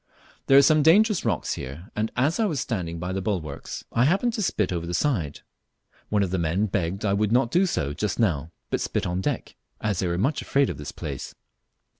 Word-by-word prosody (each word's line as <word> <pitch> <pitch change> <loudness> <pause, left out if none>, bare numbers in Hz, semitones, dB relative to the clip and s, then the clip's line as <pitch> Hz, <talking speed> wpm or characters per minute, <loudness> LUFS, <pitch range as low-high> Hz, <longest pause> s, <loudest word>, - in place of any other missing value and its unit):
There 135 - +7
are 140 - +8
some 155 +1 +5
dangerous 200 +6 +5
rocks 105 -8 0
here, 75 +9 -8
and 110 +1 -1
as 140 - +1
I 225 - +3
was 160 -9 -1
standing 90 -10 -3
by 90 +2 -4
the 95 - -2
bulwarks, 90 -8 -4
I 120 +2 +3
happened 200 - +2
to 220 - -2
spit 105 - 0
over 85 -1 -3
the 85 - -2
side; 85 - 0 0.7
one 105 -1 +2
of 95 - -2
the 95 - 0
men 85 +5 +1
begged 100 0 -2
I 100 - +2
would 105 +1 +1
not 120 0 +3
do 185 +2 +3
so 75 - -1
just 105 +7 -2
now, 85 -8 0 0.2
but - - 0
spit - - -1
on 90 +1 -1
deck, - - -3 0.2
as 105 -4 -1
they 95 - 0
were 85 0 -1
much 135 - 0
afraid 140 -1 +2
of - - -8
this 75 - -6
place. - - -6
105 Hz, 225 wpm, -25 LUFS, 85-140 Hz, 0.7 s, are